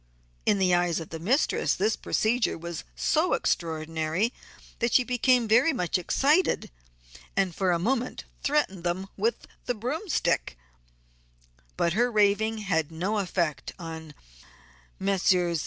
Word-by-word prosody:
In 205 Hz, -, +4 dB
the 185 Hz, -2 st, +3 dB
eyes 175 Hz, -1 st, +2 dB
of 165 Hz, -, -8 dB
the 165 Hz, -, -6 dB
mistress 245 Hz, -, +1 dB
this 210 Hz, +3 st, +1 dB
procedure 230 Hz, +2 st, 0 dB
was 170 Hz, 0 st, -6 dB
so -, -, +1 dB
extraordinary 160 Hz, +5 st, -1 dB, 0.5 s
that 235 Hz, -1 st, 0 dB
she 250 Hz, -, +5 dB
became 250 Hz, -1 st, +2 dB
very 245 Hz, +9 st, +4 dB
much 180 Hz, -6 st, 0 dB
excited 290 Hz, -, +2 dB, 0.7 s
and 190 Hz, -3 st, +2 dB
for 190 Hz, +2 st, 0 dB
a 170 Hz, -, +2 dB
moment 240 Hz, +7 st, -1 dB, 0.2 s
threatened 275 Hz, -, 0 dB
them 185 Hz, +2 st, -2 dB
with 460 Hz, +2 st, -1 dB, 0.2 s
the 245 Hz, -, 0 dB
"broomstick," 265 Hz, -, -1 dB, 1.2 s
but 170 Hz, -, +1 dB
her 240 Hz, +4 st, +2 dB
raving 215 Hz, +1 st, +2 dB
had 165 Hz, -7 st, -1 dB
no 190 Hz, +7 st, -1 dB
effect 175 Hz, -5 st, -2 dB
on 160 Hz, -3 st, -8 dB, 0.8 s
Messrs. 180 Hz, -3 st, +2 dB
195 Hz, 130 wpm, -27 LUFS, 170-235 Hz, 1.2 s, she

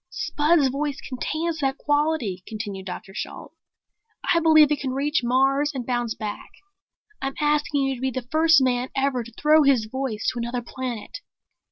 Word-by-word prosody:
"Spud's 295 Hz, -2 st, +2 dB
voice 285 Hz, +2 st, -2 dB
contains 315 Hz, +5 st, -3 dB
that 270 Hz, -2 st, 0 dB
quality," 290 Hz, -10 st, 0 dB
continued 205 Hz, -3 st, -6 dB
Dr. 190 Hz, +1 st, -7 dB
Shalt. -, -, -7 dB, 0.8 s
"I 335 Hz, -, +4 dB
believe 310 Hz, -2 st, +6 dB
it 295 Hz, -, +1 dB
can 260 Hz, -2 st, -3 dB
reach 295 Hz, +3 st, +1 dB
Mars 270 Hz, +4 st, +2 dB
and 250 Hz, -2 st, -4 dB
bounce 240 Hz, -2 st, -1 dB
back. 210 Hz, -1 st, -6 dB, 0.7 s
I'm 270 Hz, 0 st, -3 dB
asking 295 Hz, -1 st, +1 dB
you 270 Hz, 0 st, 0 dB
to 250 Hz, -, -8 dB
be 265 Hz, -, +1 dB
the 255 Hz, -1 st, -5 dB
first 320 Hz, -2 st, +5 dB
man 250 Hz, 0 st, 0 dB
ever 270 Hz, -2 st, 0 dB
to 235 Hz, -, -12 dB
throw 305 Hz, +5 st, +4 dB
his 270 Hz, -6 st, +3 dB
voice 235 Hz, -2 st, -3 dB
to 245 Hz, -, -5 dB
another 240 Hz, +1 st, -3 dB
planet." 245 Hz, -2 st, -6 dB
270 Hz, 170 wpm, -24 LUFS, 240-295 Hz, 0.8 s, believe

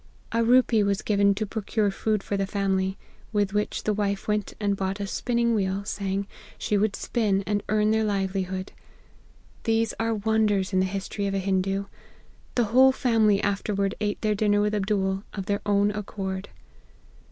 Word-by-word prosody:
A 230 Hz, 0 st, +2 dB
rupee 240 Hz, -2 st, +4 dB
was 200 Hz, 0 st, 0 dB
given 200 Hz, -1 st, +3 dB
to 215 Hz, +2 st, -1 dB
procure 210 Hz, 0 st, -1 dB
food 210 Hz, +1 st, -1 dB
for 200 Hz, -, -2 dB
the 195 Hz, -1 st, -1 dB
family, 190 Hz, -1 st, 0 dB, 0.3 s
with 205 Hz, -2 st, 0 dB
which 210 Hz, 0 st, -1 dB
the 215 Hz, -, +1 dB
wife 200 Hz, -1 st, -2 dB
went 210 Hz, -1 st, -1 dB
and 205 Hz, -1 st, +1 dB
bought 195 Hz, +1 st, -2 dB
a 200 Hz, -, -2 dB
spinning 235 Hz, +3 st, 0 dB
wheel, 195 Hz, -1 st, -1 dB
saying, 200 Hz, -1 st, -2 dB, 0.3 s
she 210 Hz, -, -1 dB
would 205 Hz, 0 st, +1 dB
spin 205 Hz, -5 st, 0 dB
and 205 Hz, -1 st, 0 dB
earn 215 Hz, 0 st, +3 dB
their 220 Hz, 0 st, +2 dB
livelihood. 190 Hz, -2 st, -2 dB, 0.9 s
These 225 Hz, -1 st, +1 dB
are 225 Hz, 0 st, +1 dB
wonders 210 Hz, -2 st, +1 dB
in 185 Hz, -, +3 dB
the 190 Hz, -, +2 dB
history 195 Hz, +1 st, -3 dB
of 195 Hz, -, -1 dB
a -, -, +1 dB
Hindoo. 195 Hz, +1 st, 0 dB, 0.7 s
The 245 Hz, -, +3 dB
whole 265 Hz, +1 st, +7 dB
family 220 Hz, -5 st, +2 dB
after 200 Hz, +1 st, -1 dB
ward 195 Hz, 0 st, 0 dB
ate 205 Hz, -1 st, -1 dB
their 215 Hz, -1 st, +2 dB
dinner 205 Hz, 0 st, +2 dB
with 210 Hz, 0 st, +1 dB
Abdool, 195 Hz, -1 st, 0 dB
of 195 Hz, -2 st, -4 dB
their 200 Hz, 0 st, -1 dB
own 205 Hz, 0 st, +3 dB
accord. 195 Hz, -2 st, -5 dB
205 Hz, 175 wpm, -26 LUFS, 195-215 Hz, 0.9 s, whole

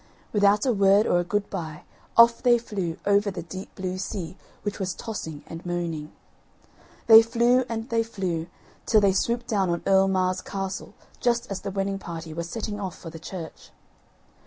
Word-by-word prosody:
Without 205 Hz, +1 st, +4 dB
a 255 Hz, -, +3 dB
word 200 Hz, +1 st, +5 dB
or 175 Hz, -, +3 dB
a -, -, +1 dB
good 205 Hz, +3 st, -1 dB
bye 160 Hz, -5 st, -5 dB, 0.3 s
off 235 Hz, 0 st, +7 dB
they 240 Hz, -1 st, +5 dB
flew 195 Hz, -7 st, -4 dB
over 200 Hz, 0 st, +3 dB
the 180 Hz, -3 st, -5 dB
deep 185 Hz, +3 st, -9 dB
blue 185 Hz, -1 st, -4 dB
sea 185 Hz, -3 st, -5 dB, 0.3 s
which 205 Hz, 0 st, -3 dB
was 185 Hz, -2 st, -2 dB
tossing 160 Hz, -9 st, -6 dB
and 165 Hz, +1 st, -9 dB
moaning. 170 Hz, -3 st, -3 dB, 0.9 s
They 225 Hz, -1 st, +10 dB
flew 240 Hz, +2 st, +2 dB
and 225 Hz, 0 st, -3 dB
they 230 Hz, -1 st, +2 dB
flew 185 Hz, -7 st, -3 dB, 0.4 s
till 220 Hz, -, +5 dB
they 200 Hz, -1 st, +4 dB
swooped 235 Hz, +4 st, 0 dB
down 200 Hz, -6 st, 0 dB
on 170 Hz, 0 st, -1 dB
Earl 195 Hz, 0 st, +5 dB
Mar's 185 Hz, -1 st, +1 dB
castle 195 Hz, +1 st, -5 dB, 0.2 s
just 235 Hz, -3 st, 0 dB
as 195 Hz, -, -3 dB
the -, -, -4 dB
wedding 195 Hz, 0 st, -2 dB
party 165 Hz, -3 st, -7 dB
were 170 Hz, -, -3 dB
setting 205 Hz, +4 st, -4 dB
out 190 Hz, -3 st, -4 dB
for 165 Hz, -, -9 dB
the 165 Hz, -, -9 dB
church. 165 Hz, -1 st, -8 dB
195 Hz, 185 wpm, -25 LUFS, 175-215 Hz, 0.9 s, They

